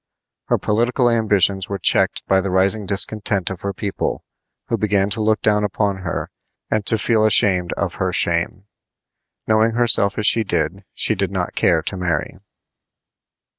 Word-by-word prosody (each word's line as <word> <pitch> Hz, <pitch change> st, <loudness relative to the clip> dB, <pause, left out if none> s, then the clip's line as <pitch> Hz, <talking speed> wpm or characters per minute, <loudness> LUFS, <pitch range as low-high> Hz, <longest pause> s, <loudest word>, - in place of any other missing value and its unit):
Her -, -, +1 dB
political 120 Hz, +3 st, 0 dB
ambitions 100 Hz, -4 st, +1 dB
were 100 Hz, -, -3 dB
checked 90 Hz, -, +1 dB
by 95 Hz, 0 st, +2 dB
the 100 Hz, -, -3 dB
rising 95 Hz, +2 st, +1 dB
discontent 100 Hz, -1 st, +1 dB
of 95 Hz, -, -7 dB
her 100 Hz, -, -3 dB
people, 100 Hz, +1 st, -4 dB, 0.5 s
who -, -, +1 dB
began 105 Hz, -2 st, 0 dB
to 110 Hz, -, -1 dB
look 110 Hz, 0 st, +1 dB
down 105 Hz, -1 st, +2 dB
upon 100 Hz, -1 st, -1 dB
her 95 Hz, -, -5 dB, 0.4 s
and 110 Hz, -1 st, 0 dB
to 110 Hz, -, +4 dB
feel 110 Hz, 0 st, +1 dB
ashamed 95 Hz, -4 st, +3 dB
of -, -, -3 dB
her 95 Hz, -1 st, 0 dB
shame. 85 Hz, +2 st, 0 dB, 0.8 s
Knowing 110 Hz, +1 st, +2 dB
herself 115 Hz, -4 st, +2 dB
as 105 Hz, -, 0 dB
she 115 Hz, 0 st, +4 dB
did, 100 Hz, -, -2 dB
she -, -, +1 dB
did -, -, -2 dB
not -, -, -3 dB
care 80 Hz, -2 st, +1 dB
to 95 Hz, -, -5 dB
marry. 90 Hz, 0 st, -3 dB
100 Hz, 165 wpm, -19 LUFS, 95-110 Hz, 0.8 s, to